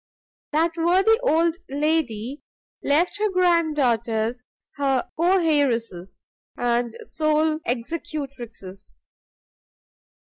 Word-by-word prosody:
That 320 +3 +2
worthy 375 +7 +3
old 335 -7 +2
lady 280 -4 -1 0.4
left 335 +8 +1
her 425 0 +2
grand 345 -4 +2
daughters 235 -2 0 0.3
her 270 -3 0
co 355 +4 +3
heiresses 235 - 0 0.3
and 240 -1 0
sole 310 0 +1
executrixes. 240 - -6
290 Hz, 80 wpm, -23 LUFS, 235-330 Hz, 0.4 s, worthy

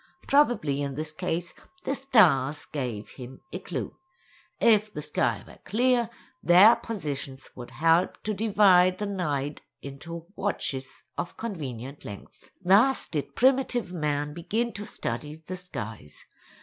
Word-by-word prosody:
Probably 235 - +3
in 140 -1 -3
this 155 +1 -2
case 170 +1 -3 0.3
the 270 - -1
stars 170 - +3
gave 125 -7 -4
him 130 0 -11
a - - -3
clue. - - -5 0.6
If 215 -2 +4
the 150 - -5
sky 150 - 0
were - - -15
clear, 240 +1 +2 0.3
their 190 +7 +8
positions 140 -10 -5
would 120 -1 -8
help 165 +2 +2
to 215 - -1
divide 195 -4 +4
the 210 - -3
night 150 -8 -2 0.2
into 165 +5 -8
"watches" 135 -10 -3 0.2
of 175 - -4
convenient 140 - -6
length. 100 -1 -11
Thus 215 +9 +4
did 150 -4 -4
primitive 255 -6 +2
man 150 -3 -1
begin 215 +9 -1
to 205 +1 -6
study 150 +7 -5
the 185 - -5
skies. 110 - -8
170 Hz, 135 wpm, -27 LUFS, 140-210 Hz, 0.6 s, their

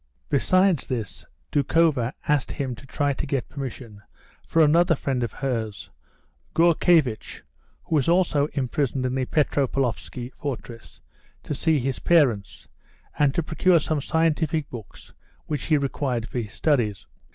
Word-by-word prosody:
Besides 185 -4 +3
this, 110 - -4 0.3
Doukhova 145 -4 +2
asked 145 -2 +1
him 135 -3 -3
to 135 +4 -12
try 145 0 0
and 140 +2 -4
get 135 -3 -2
permission 125 -6 -7 0.4
for 165 - +3
another 165 +3 +4
friend 135 -2 -2
of 120 -3 -2
hers, 115 - -4 0.6
Gourkevitch 165 -7 +2 0.4
(who 160 - -2
was 140 +2 +1
also 170 -5 +3
imprisoned 135 -1 -1
in 125 - -1
the 130 -1 0
Petropavlovsky 135 -4 -1
fortress), 120 -5 -7 0.4
to - - -4
see 160 +2 +2
his 135 -1 -2
parents, 130 - +2 0.5
and 145 -2 +3
to 170 - +1
procure 165 +3 +3
some 155 -1 -1
scientific 160 -1 0
books 115 -5 -11 0.3
which 150 -4 -3
he 155 - +3
required 135 -4 -2
for 125 - -3
his 105 -4 -5
studies. 115 - 0
140 Hz, 140 wpm, -24 LUFS, 125-155 Hz, 0.6 s, another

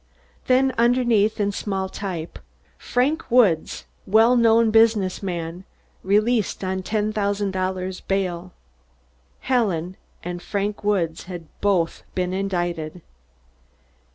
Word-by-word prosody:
Then 260 +1 +3
underneath 235 -3 +3
in 205 -1 +1
small 195 -1 -3
type: 185 -4 -6 0.4
"Frank 270 +6 0
Woods, 215 -10 +2 0.2
Well 225 +5 +5
Known 230 -1 +4
Business 220 -4 +3
Man, 175 -2 -4 0.4
Released 210 +2 +1
on 190 0 -2
$10,000 200 -3 -2
Bail." 185 -2 -2 0.9
Helen 190 -9 0 0.3
and 175 0 -5
Frank 205 +2 -3
Woods 175 -6 0
had 175 -2 -8 0.2
both 185 -5 +1
been 180 0 -1
indicted. 175 -4 -3
195 Hz, 100 wpm, -23 LUFS, 180-220 Hz, 0.9 s, Well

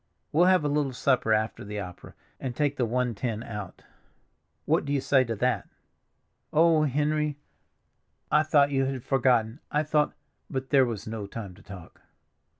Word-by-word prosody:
We'll 170 +4 +4
have 185 -4 +4
a - - +3
little 145 -2 0
supper 125 -3 +1
after 110 0 0
the 105 0 -5
opera, 90 -3 -9 0.2
and 125 -3 -4
take 145 0 0
the 125 -4 0
one 125 +1 0
ten 115 0 -3
out. 105 -6 -8 0.8
What - - +2
do 140 - -4
you 145 - +2
say 135 0 +3
to 115 -1 -3
that?" 125 +4 0 0.8
"Oh, 160 -1 +4
Henry! 150 +1 0 0.9
I 150 - +5
thought 145 -2 +3
you 135 -1 +2
had 130 -2 -3
forgotten, 125 -2 +2
I 150 +1 +1
thought—" 150 -1 +1 0.4
But 130 0 -4
there 135 -3 +6
was 110 -4 -5
no 110 -2 -5
time 100 -3 -7
to - - -17
talk. 95 -4 -12
130 Hz, 170 wpm, -27 LUFS, 110-145 Hz, 0.9 s, there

